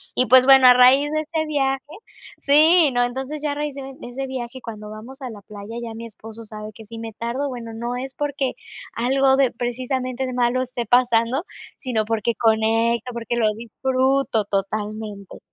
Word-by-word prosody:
y, 255 - +2
pues, 255 0 +7
bueno, 265 -1 +8
a 250 - +9
raíz 260 +4 +5
de 310 0 0
este 315 0 -3
viaje 270 -3 0 0.6
sí, 310 +2 +5
no, 245 0 +2
entonces 265 +5 -4
ya 295 -1 -1
a - - -3
raíz 295 -1 -3
de 270 -1 -8
de - - -9
ese 270 +2 -5
viaje, 260 -1 -6
cuando 215 -3 -8
vamos 240 +6 -11
a 255 - -5
la 210 -3 -10
playa, 205 +2 -10
ya 230 -1 -6
mi 230 - -7
esposo 225 0 -11
sabe 215 0 -8
que 220 - -13
si 230 +2 -10
me 225 0 -6
tardo, 240 +6 -3
bueno, 235 -3 -7
no 235 +2 -4
es 265 +1 -6
porque 285 -3 -2 0.4
algo 265 +3 +2
de 265 -3 +3
precisamente 255 +1 -3
malo 245 +1 +1
esté 245 -1 -5
pasando, 245 - +2 0.3
sino 230 -5 -2
porque 225 +1 -1
conecto, 225 +2 +1
porque 235 0 -3
lo 215 -2 +2
disfruto 255 0 0
totalmente. 205 0 -4
245 Hz, 185 wpm, -22 LUFS, 225-270 Hz, 0.6 s, a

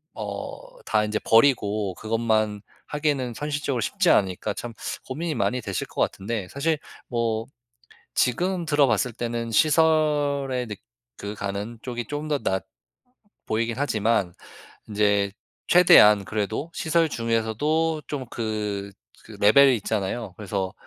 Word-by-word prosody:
어 - - -7
다 105 - +2
인제 105 0 -1
버리고 110 -5 +3
그것만 110 -2 0 0.3
하기에는 145 -5 -1
현실적으로 145 -4 -2
쉽지 190 - +1
않으니까 95 0 +2
참 115 +2 -7 0.3
고민이 155 +4 -3
많이 125 0 0
되실 95 -3 -3
것 - - -4
같은데, 100 -1 -2
사실 155 +2 -1 0.3
뭐 115 -2 -1 1.1
지금 175 -2 -3
들어봤을 125 -7 +2
때는 115 0 -3
시설의 145 -3 +2
느 105 - -5 0.4
그 100 +1 -5
가는 100 +3 -5
쪽이 120 -2 -5
좀 145 +1 -5
더 150 -2 +1
낫 95 -7 -1 0.8
보이긴 115 +1 -1
하지만 110 -8 +1 0.6
인제 100 -1 +2 0.4
최대한 105 - +7
그래도 110 +9 -3
시설 165 0 +1
중에서도 145 +8 0
좀 135 -3 -4
그 105 -4 -3 0.3
그 - - -14
레벨이 130 +5 +6
있잖아요. 105 0 -3
그래서 100 -2 -3
115 Hz, 265 characters per minute, -24 LUFS, 105-145 Hz, 1.1 s, 최대한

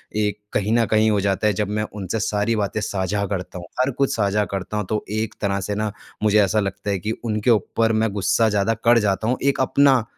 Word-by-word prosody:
एक 105 -1 0
कहीं 105 +1 0
न 115 0 +3
कहीं 110 0 +4
हो 105 - +2
जाता 100 +2 +1
है 105 - +2
जब 105 +2 -1
मैं 105 +1 -1
उनसे 100 +1 -3
सारी 105 +2 0
बातें 105 0 -1
साझा 100 0 -1
करता 95 -2 -4
हूँ, 85 - -9
हर 130 +2 +2
कुछ 140 -1 +1
साझा 105 -1 +1
करता 100 +2 -4
हूँ 105 - -1
तो 110 -1 -1
एक 110 0 -2
तरह 100 -1 0
से 105 +2 -3
ना 105 0 -1 0.3
मुझे 105 0 +4
ऐसा 100 +2 +2
लगता 100 0 -3
है 100 -1 0
कि 105 +5 -3
उनके 110 +1 0
ऊपर 115 +1 +1
मैं 110 0 +1
गुस्सा 100 +3 +2
ज़्यादा 105 +1 +1
कर 120 0 +5
जाता 105 0 0
हूँ, 125 +2 +1
एक 140 0 +2
अपना 135 -2 +4
105 Hz, 235 wpm, -22 LUFS, 100-110 Hz, 0.3 s, कर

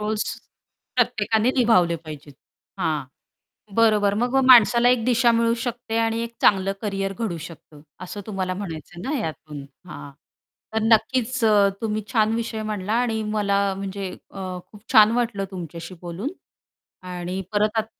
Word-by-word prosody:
Rolls 215 0 -1 0.7
प्रत्येकाने 230 -1 +2
निभावले 185 -9 +4
पाहिजेत. 150 -3 -10 0.5
हां, 155 -5 0 0.7
बरोबर 215 -3 +4
मग 245 +1 0
अ, - - +4
माणसाला 240 +1 +7
एक 245 -3 +2
दिशा 245 -1 +4
मिळू 230 0 +2
शकते 240 -1 -3
आणि 225 0 +1
एक 235 - -7
चांगलं 195 -1 +4
करियर 195 -2 -2
घडू 210 -8 -2
शकतं. 155 -3 -15 0.2
असं 205 +3 -7
तुम्हाला 190 -3 -2
म्हणायचं 165 -2 -8
आहे - - -7
ना - - -1
यातून. 155 -2 -7 0.2
हां, 145 - -9 0.6
तर 220 - 0
नक्कीच 230 +2 +2
अ, 205 -2 +5
तुम्ही 215 -1 -2
छान 220 -2 +3
विषय 230 -1 -3
म्हटला 210 -1 -3
आणि 225 -3 -1
मला 200 -2 +1 0.2
म्हणजे 195 -1 -5 0.2
अ, 195 - -9 0.3
खूप 210 -1 -14
छान 215 -2 +8
वाटलं 230 -5 -1
तुमच्याशी 170 0 -7
बोलून 175 +9 -4 0.8
आणि 180 +1 -4
परत 210 +1 +1
आत 220 - +1
210 Hz, 150 wpm, -23 LUFS, 185-230 Hz, 0.8 s, छान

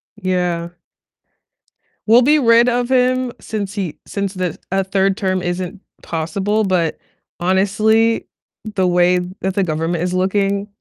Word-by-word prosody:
Yeah. 180 -3 -1 1.4
We'll 235 +3 +7
be 295 +4 +4
rid 235 -1 +5
of 245 0 0
him 255 -1 +2
since 205 -3 -4
he 185 -7 -3
since 200 -1 -3
the 185 -4 -3
a 195 0 +1
3rd 195 0 +1
term 185 -3 0
isn't 180 +2 -4 0.2
possible, 190 +7 -1
but 180 -5 0 0.4
honestly, 215 +5 +2 0.5
the 185 -1 +2
way 180 0 +3 0.2
that 190 0 -1
the 195 - +2
government 165 +1 -1
is 180 - -1
looking, 195 +2 0
195 Hz, 135 wpm, -18 LUFS, 180-215 Hz, 1.4 s, We'll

